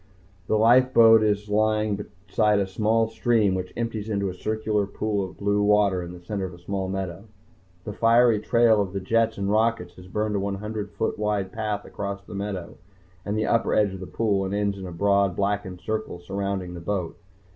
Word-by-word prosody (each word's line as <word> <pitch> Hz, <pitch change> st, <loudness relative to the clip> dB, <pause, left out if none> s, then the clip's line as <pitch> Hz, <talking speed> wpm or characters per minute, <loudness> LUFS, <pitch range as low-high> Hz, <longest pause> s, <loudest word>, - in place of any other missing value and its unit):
The 110 Hz, -, +2 dB
life 125 Hz, +4 st, +4 dB
boat 115 Hz, -1 st, +8 dB
is 105 Hz, -1 st, 0 dB
lying 105 Hz, -1 st, 0 dB, 0.2 s
beside 105 Hz, -2 st, +2 dB
a 100 Hz, -, +1 dB
small 110 Hz, +4 st, +1 dB
stream 110 Hz, -2 st, +1 dB
which 90 Hz, -1 st, -3 dB
empties 115 Hz, -2 st, -3 dB
into 100 Hz, -2 st, -1 dB
a -, -, -5 dB
circular 105 Hz, +1 st, -1 dB
pool 105 Hz, 0 st, -2 dB
of 95 Hz, -, -8 dB
blue 100 Hz, 0 st, +1 dB
water 105 Hz, -3 st, +3 dB
in 85 Hz, 0 st, -7 dB
the 90 Hz, -, -10 dB
center 100 Hz, 0 st, -3 dB
of 90 Hz, -1 st, -8 dB
a -, -, -15 dB
small 95 Hz, +1 st, -4 dB
meadow. 95 Hz, 0 st, -4 dB, 0.6 s
The 105 Hz, -, -6 dB
fiery 115 Hz, 0 st, +4 dB
trail 115 Hz, 0 st, +3 dB
of 95 Hz, -2 st, -3 dB
the 100 Hz, -, -2 dB
jets 115 Hz, +3 st, +1 dB
and 100 Hz, 0 st, -2 dB
rockets 110 Hz, -3 st, +1 dB
has 90 Hz, 0 st, -12 dB
burned 105 Hz, +2 st, -2 dB
a 100 Hz, 0 st, -2 dB
hundred 105 Hz, 0 st, -5 dB
foot 100 Hz, 0 st, -3 dB
wide 105 Hz, -3 st, -1 dB
path 105 Hz, -2 st, -3 dB
across 100 Hz, -1 st, -5 dB
the -, -, -11 dB
meadow, 100 Hz, -3 st, -5 dB, 0.5 s
and 105 Hz, +1 st, -2 dB
the 110 Hz, -, 0 dB
upper 115 Hz, -1 st, +1 dB
edge 105 Hz, -2 st, +2 dB
of 95 Hz, -, -7 dB
the 95 Hz, -, -7 dB
pool, 105 Hz, -4 st, 0 dB
and 95 Hz, +1 st, -2 dB
ends 100 Hz, -1 st, 0 dB
in 95 Hz, -, -6 dB
a -, -, -7 dB
broad, 100 Hz, +1 st, +2 dB
blackened 100 Hz, -2 st, -2 dB
circle 110 Hz, -4 st, -3 dB
surrounding 95 Hz, 0 st, -4 dB
the 85 Hz, -, -7 dB
boat. 90 Hz, -1 st, -3 dB
105 Hz, 205 wpm, -25 LUFS, 95-110 Hz, 0.6 s, boat